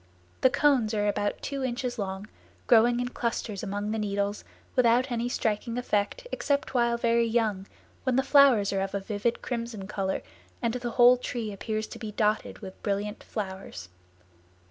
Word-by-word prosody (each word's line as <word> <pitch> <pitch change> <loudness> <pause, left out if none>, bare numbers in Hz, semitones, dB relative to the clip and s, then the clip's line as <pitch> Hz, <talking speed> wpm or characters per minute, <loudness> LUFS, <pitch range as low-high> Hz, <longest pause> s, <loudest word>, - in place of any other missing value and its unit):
The 260 - +6
cones 255 -5 +2
are 210 0 +1
about 205 0 -1
two 275 -1 -3
inches 245 -1 -2
long, 195 0 -4 0.4
growing 240 +1 +5
in 245 0 -1
clusters 230 -4 -3
among 205 0 -3
the 220 - -1
needles 200 0 -1 0.3
without 250 +1 +3
any 240 0 -1
striking 230 0 -1
effect 245 - -1
except 285 -1 -1
while 235 -1 +2
very 235 0 +2
young, 215 -4 0 0.3
when 260 -3 0
the 265 - +3
flowers 265 -8 +5
are 195 - 0
of 195 +1 -3
a - - 0
vivid 210 +4 -2
crimson 235 -5 -4
color 190 -1 -2 0.4
and 235 -2 0
the 245 -1 -3
whole 245 +1 +6
tree 235 -3 -4
appears 215 +2 -3
to - - -10
be 215 -2 -6
dotted 215 +1 0
with 190 -1 -9
brilliant 205 +1 -2
flowers. 190 - -6
225 Hz, 165 wpm, -28 LUFS, 205-245 Hz, 0.4 s, The